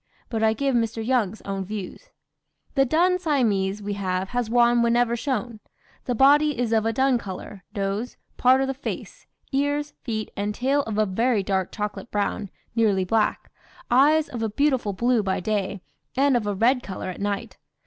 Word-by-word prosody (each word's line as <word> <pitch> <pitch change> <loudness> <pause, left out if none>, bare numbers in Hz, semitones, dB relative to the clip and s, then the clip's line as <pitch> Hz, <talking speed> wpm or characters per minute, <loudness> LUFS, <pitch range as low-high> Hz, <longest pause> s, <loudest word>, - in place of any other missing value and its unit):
But 225 -2 -2
I 220 0 +4
give 275 +4 0
Mr. 230 -1 0
Young's 225 -5 0
own 195 -1 -3
views: 210 - -7 0.6
"The 270 -1 +3
dun 355 +7 +2
Siamese 210 - 0
we 205 0 -2
have 190 -1 -2
has 245 -2 -2
won 240 0 +4
whenever 235 0 +2
shown; 235 -3 -3 0.5
the 245 - -1
body 290 +3 +5
is 235 -2 0
of 220 0 +2
a - - +2
dun 260 +1 +2
colour, 190 -1 -8
nose, 200 +4 -2 0.2
part 260 +1 +4
of 270 - 0
the 270 - -1
face, 280 - -7 0.2
ears, 290 +1 0
feet, 220 -4 -4
and 205 +1 -2
tail 275 +3 +1
of 215 -2 -3
a 215 - +3
very 220 +2 +1
dark 190 -1 -1
chocolate 210 +3 -5
brown, 205 0 -2 0.3
nearly 205 -5 +2
black, 215 +3 0 0.4
eyes 295 +5 +5
of 235 - -6
a 225 - 0
beautiful 260 -2 +1
blue 235 +3 +2
by 190 -2 -1
day, 200 -1 -2 0.4
and 275 0 +4
of 225 -4 0
a 205 - -1
red 245 +6 +3
colour 190 -3 -6
at 180 - -9
night! 200 -1 -3
225 Hz, 180 wpm, -24 LUFS, 205-260 Hz, 0.6 s, body